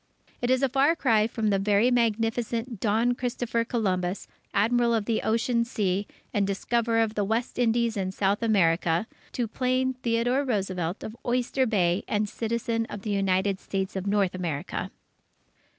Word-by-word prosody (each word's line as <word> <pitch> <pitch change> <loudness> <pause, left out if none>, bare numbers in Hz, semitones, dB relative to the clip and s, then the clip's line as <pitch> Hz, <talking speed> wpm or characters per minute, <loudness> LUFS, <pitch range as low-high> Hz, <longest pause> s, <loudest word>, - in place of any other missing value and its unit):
It 245 - 0
is 260 +1 +2
a - - +5
far 275 +5 +3
cry 225 -8 +3
from 225 -2 -1
the 195 - +2
Very 205 +4 +3
Magnificent 230 0 0
Don 225 +4 +2
Christopher 240 -1 -1
Columbus, 190 -6 -1 0.2
Admiral 235 +3 +2
of 215 -2 -1
the 225 0 0
Ocean 235 +1 +1
Sea, 200 -4 -1 0.3
and 200 -1 +1
discoverer 230 +3 +1
of 220 -1 -2
the 210 - 0
West 225 +5 -2
Indies 235 -1 +2
and 190 -2 -2
South 195 +2 0
America, 175 -4 +2 0.3
to 240 -2 -1
plain 255 +3 0
Theodore 245 +2 0
Roosevelt 190 -7 -2
of 220 - -6
Oyster 250 +2 +1
Bay 185 -4 +1
and 210 0 0
citizen 230 +1 -2
of 205 - -8
the 215 - -2
United 195 0 +1
States 195 0 -3
of 190 +1 -3
North 200 -2 +2
America. 175 +1 -3
220 Hz, 160 wpm, -26 LUFS, 195-240 Hz, 0.3 s, a